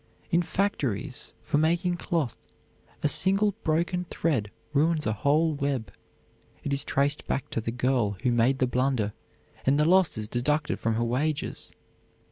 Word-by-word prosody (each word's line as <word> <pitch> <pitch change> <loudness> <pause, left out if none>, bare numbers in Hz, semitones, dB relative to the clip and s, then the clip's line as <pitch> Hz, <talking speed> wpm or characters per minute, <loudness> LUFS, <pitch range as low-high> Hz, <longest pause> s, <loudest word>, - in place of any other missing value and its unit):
In 170 - +4
factories 145 - -2
for 145 - +1
making 175 +3 +1
cloth 160 -8 -1 0.7
a - - +4
single 195 +6 +2
broken 170 +3 0
thread 135 -11 -1 0.2
ruins 155 +1 +2
a 110 - +1
whole 150 +8 +2
web; 140 -7 -2 0.7
it 140 - -1
is 140 0 +1
traced 140 +1 0
back 135 - -2
to 115 - -1
the 115 - -3
girl 120 -4 0
who 125 - +3
made 120 +3 +3
the 130 - +2
blunder 125 -4 0 0.5
and 140 +2 +3
the 150 - +4
loss 185 -3 +4
is 105 -1 -2
deducted 150 +6 0
from 115 -1 0
her 115 - 0
wages. 140 +6 -2
140 Hz, 155 wpm, -27 LUFS, 120-160 Hz, 0.7 s, In